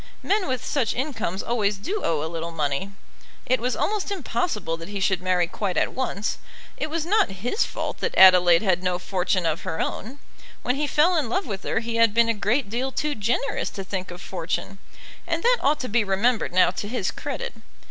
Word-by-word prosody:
Men 410 -1 +1
with 255 -1 -2
such 255 -7 0
incomes 235 - -2
always 210 -4 0
do 390 - -3
owe 155 -3 0
a - - -2
little 165 0 -4
money. 155 +3 -2 0.5
It 255 - +2
was 250 +1 -1
almost 420 -1 -1
impossible 240 - -2
that 165 - -9
he 205 -1 -4
should 190 -1 +1
marry 180 -1 +2
quite 185 +2 -3
at - - +1
once. 220 -5 -2 0.4
It 305 - -3
was 320 0 -2
not 415 - +3
his 250 - +1
fault - - -4
that 470 - -2
Adelaide 180 -2 +7
had 185 -3 +2
no 180 -1 0
fortune 180 -1 -1
of 160 0 0
her 160 - -4
own. 250 +7 -3 0.5
When 250 - +1
he 295 +1 0
fell 320 +6 +3
in 285 -7 0
love 380 - 0
with 200 -3 -5
her - - 0
he 230 0 -3
had 230 -2 +4
been 230 0 +4
a - - +3
great 225 +5 0
deal 245 +6 -2
too 300 +2 -1
generous 240 +4 -1
to 195 - -6
think 190 -1 -4
of 175 +1 -8
fortune, 185 +2 -4 0.5
and 335 -1 -1
that - - +4
ought 295 +2 +2
to 255 - -3
be 230 0 +2
remembered 210 +4 +1
now 185 0 +4
to 205 - -5
his 210 -4 -1
credit. 485 0 -5
220 Hz, 210 wpm, -24 LUFS, 185-270 Hz, 0.5 s, Adelaide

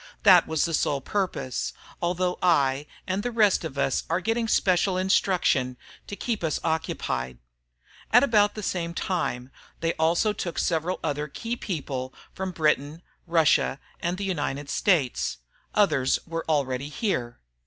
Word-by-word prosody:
That 185 -4 +7
was 160 -1 +1
the 165 - -3
sole 145 -2 +1
purpose, 175 -6 -2 0.3
although 180 +1 0
I 145 -5 +2 0.2
and 190 +1 -1
the 245 - -2
rest 215 -6 +3
of 150 -4 -6
us 135 -1 +1
are 165 +2 +1
getting 225 +4 0
special 185 -2 +2
instruction 180 -9 +2 0.3
to 205 - -5
keep 225 -3 -3
us 160 -2 0
occupied. 65 - -2 0.7
About 220 -4 +5
the 215 - -5
same 170 -2 -2
time, 130 -10 -2 0.3
they 165 0 0
also 170 +7 +2
took 175 -4 -5
several 170 +2 0
other 150 -1 -1
key 230 +10 -4
people 135 - -4 0.2
from 190 0 -3
Britain, 155 -1 0 0.2
Russia, 160 -4 +3 0.2
and 175 +2 -2
the 200 - -4
United 145 -6 -2
States. 150 - +1 0.4
Others 150 -11 +3
were 165 0 -4
already 140 -2 0
here. 145 - -2
165 Hz, 145 wpm, -26 LUFS, 145-190 Hz, 0.7 s, That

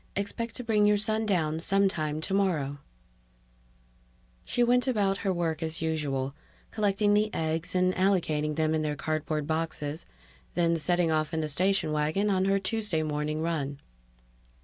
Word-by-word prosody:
Expect 225 +3 -3
to 250 - -4
bring 210 -3 +3
your 210 0 +4
son 215 +1 0
down 160 -5 +1
sometime 165 -5 0
tomorrow_. 165 -7 0 1.6
She 245 - +1
went 250 +2 +3
about 200 -6 +1
her 195 - 0
work 165 -3 -1
as 160 0 -2
usual, 140 -4 -1 0.4
collecting 205 -1 +2
the 215 +1 +2
eggs 160 +2 -2
and 185 0 +3
allocating 160 -6 +1
them 160 0 +1
in 160 - +1
their 150 -1 -1
cardboard 155 +1 -2
boxes, 160 -1 -3 0.5
then 170 -1 +2
setting 175 +1 +2
off 155 +1 0
in - - 0
the 155 - -1
station 185 +3 +1
wagon 155 +7 +1
on 190 -1 +2
her 195 0 +3
Tuesday 195 -4 0
morning 150 +1 -2
run. 145 -4 -2
165 Hz, 150 wpm, -28 LUFS, 155-200 Hz, 1.6 s, your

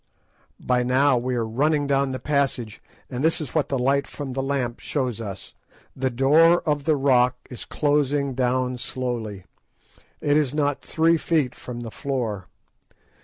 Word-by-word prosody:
_" - - -17
By 125 -1 +3
now 130 +2 +3
we 125 +1 -2
are 115 -2 0
running 145 +6 +1
down 140 -1 +1
the 130 - -3
passage, 135 -6 -1 0.3
and 130 +1 -4
this 160 +1 +2
is 150 -6 -6
what 155 -3 0
the 135 - 0
light 135 +2 +1
from 145 -3 -6
the 135 +1 -2
lamp 135 -3 -2
shows 125 -6 -2
us. 100 -3 -7 0.4
The 130 0 0
door 155 +7 +4
of 145 -3 -1
the 155 - +3
rock 125 -3 +3
is 125 - -7
closing 145 -2 +1
down 125 0 0
slowly; 115 -5 -4 0.8
it 145 0 +2
is 145 -2 0
not 145 -2 0
three 165 +1 +2
feet 155 -6 0
from 120 -1 -8
the 115 -2 -7
floor. 115 -10 -3
135 Hz, 170 wpm, -24 LUFS, 125-145 Hz, 0.8 s, door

